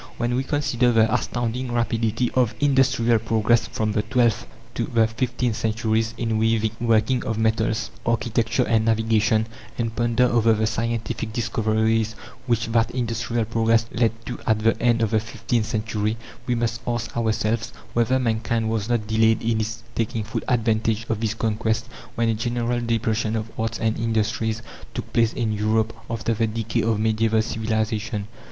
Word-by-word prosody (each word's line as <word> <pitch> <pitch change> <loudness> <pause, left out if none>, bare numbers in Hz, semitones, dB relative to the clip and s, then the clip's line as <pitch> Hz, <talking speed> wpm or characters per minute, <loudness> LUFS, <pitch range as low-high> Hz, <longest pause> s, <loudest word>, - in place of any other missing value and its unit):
When 120 +1 0
we 130 +2 +1
consider 135 -4 +1
the 110 -1 +3
astounding 120 +1 -1
rapidity 115 0 0
of 125 -4 +2
industrial 130 -5 +3
progress 115 +1 +2
from 110 -1 -1
the 105 - +1
twelfth 115 +1 +1 0.3
to - - -1
the 115 -2 +3
fifteenth 120 +1 -1
centuries 110 0 0
in 115 -2 0
weaving, 110 -1 +2
working 115 +2 +2
of 110 - -2
metals, 110 -1 0
architecture 115 +1 +1
and 115 -2 +2
navigation, 110 -1 +2 0.3
and 115 -1 -2
ponder 120 +1 +2
over 115 -2 +3
the 110 0 +1
scientific 115 0 -2
discoveries 110 -1 +1 0.3
which 115 -1 +1
that 115 0 +2
industrial 115 -1 -1
progress 115 0 +2
led 115 -1 +2 0.2
to 120 - -5
at 110 - +4
the 110 +1 +2
end 120 -1 +3
of 110 - 0
the 110 - +3
fifteenth 110 +1 -2
century 110 0 -1 0.3
we 125 - +1
must 115 -1 -1
ask 120 -1 -2
ourselves 110 -1 0 0.2
whether 120 +2 +2
mankind 115 -2 0
was 110 -1 -2
not 120 -3 +1
delayed 110 +1 +2
in 115 -1 +1
its 110 +1 -4
taking 115 -1 -1
full 110 - -3
advantage 115 -2 +1
of 110 -2 0
these 110 -1 -1
conquests 110 0 -1 0.3
when 115 0 +1
a 115 - +2
general 120 +2 -1
depression 115 -1 0
of 110 0 -3
arts 115 0 -1
and 110 -1 -1
industries 110 0 0 0.3
took - - -6
place 115 -1 +3
in 115 -3 -1
Europe 110 +1 +1 0.2
after 115 0 -1
the 115 +1 +1
decay 115 0 -1
of 110 -1 +1
medieval 110 0 +2
civilization. 110 -1 -2
115 Hz, 165 wpm, -23 LUFS, 110-115 Hz, 0.3 s, at